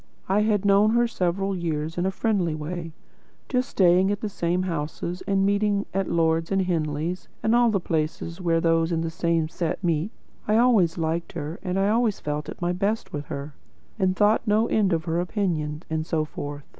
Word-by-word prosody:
I 195 +2 +2
had 210 -2 +1
known 205 +2 +5
her 240 0 +4
several 195 -1 -1
years 160 -2 -2
in 175 +2 0
a - - +2
friendly 190 -6 0
way, 165 +2 -5 0.6
just 255 0 0
staying 185 0 +4
at 205 -1 -1
the 215 - -2
same 180 -2 -1
houses, 170 +1 -3
and 195 -1 +2
meeting 200 0 +1
at 195 0 -1
Lord's 165 0 +1
and 195 -1 +2
Henley 160 -1 -1 0.3
and 220 - +2
all 240 0 +5
the 205 -3 +1
places 165 +1 -3
where 165 -2 +2
those 165 0 +2
in 165 -1 0
the 165 0 -2
same 165 -1 0
set 165 0 -3
do - - -1
meet. 170 +4 0 0.4
I 215 +1 +3
always 220 -9 +4
liked 165 +1 -2
her, 155 +1 -5
and 185 -1 -2
always 215 +2 +2
felt 150 0 -3
at - - -7
my 175 - +1
best 200 +5 -1
with 145 -1 -4
her, 140 +2 -6 0.5
and 185 -1 +2
thought 210 +3 +3
no 215 +2 +3
end 205 -3 +2
of 165 -1 +1
her 165 0 0
opinion, 175 -5 -2
and 160 0 -1
so 155 -1 -1
forth. 145 -1 -6
175 Hz, 200 wpm, -25 LUFS, 160-200 Hz, 0.6 s, known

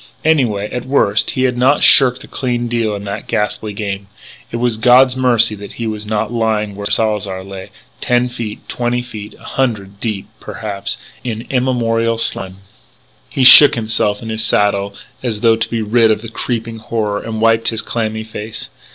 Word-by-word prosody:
Anyway, 120 -10 +1
at 125 +1 -5
worst 110 -7 +2
he 130 - +1
had 125 -1 +1
not 130 +4 +2
shirked 130 -2 +6
a - - -12
clean 120 -2 -2
deal 115 -3 -1
in 100 - -7
that 100 +1 -6
ghastly 105 0 -2
game.... 100 -1 -5 0.4
It - - -5
was 120 -2 0
God's 125 +2 +5
mercy 125 -4 +3
that 100 -1 -9
he 115 - -5
was 105 -1 -4
not 110 +1 -2
lying 110 -3 -1
where 100 0 -1
Salzar 105 -4 0
lay, 95 -1 -9 0.3
ten 125 0 +1
feet 115 -4 -7
twenty 120 0 -2 0.3
a - - -18
hundred 105 -7 -3
deep, 105 -4 -3
perhaps 100 -2 -5 0.3
in 115 -1 -5
immemorial 115 -3 0
slime 95 -4 -2 0.7
He 135 - -1
shook 145 +3 +10
himself 110 -2 0
in 110 - -6
his 110 0 0
saddle 100 -2 +1 0.3
as 110 -4 -3
though 115 -1 +4
to 110 0 -3
be 115 -1 -2
rid 115 +1 +3
of 110 0 0
the 115 - -7
creeping 115 -1 -4
horror, 105 -2 -2
and 110 -1 -5
wiped 115 0 +2
his 115 -1 0
clammy 110 -1 -3
face. 110 0 -7
110 Hz, 175 wpm, -16 LUFS, 105-120 Hz, 0.7 s, shook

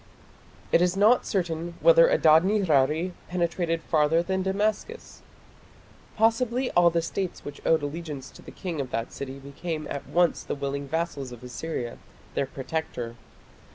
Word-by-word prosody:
It - - +5
is 180 +1 +2
not 215 +5 +4
certain 170 -3 -2
whether - - +7
Adad 160 - +6
nirari 170 -4 +2 0.2
penetrated 170 -2 -1
farther 160 +1 +2
than 190 +1 -1
Damascus. 210 - -2 1.0
Possibly 235 +3 +2
all 175 0 +5
the 170 0 0
states 185 +2 -4
which 145 0 -8
owed 160 -2 +3
allegiance 145 -3 -5
to - - -15
the - - -12
king 170 -6 -4
of 130 - -5
that 115 -1 -3
city 135 -1 -6
became 155 +3 -5
at 140 - -5
once 175 0 +2
the - - -4
willing 140 0 -3
vassals 145 -4 -3
of 120 0 -11
Assyria, 125 -1 -5 0.3
their 135 - 0
protector. 130 -4 -4
165 Hz, 150 wpm, -26 LUFS, 140-190 Hz, 1.0 s, whether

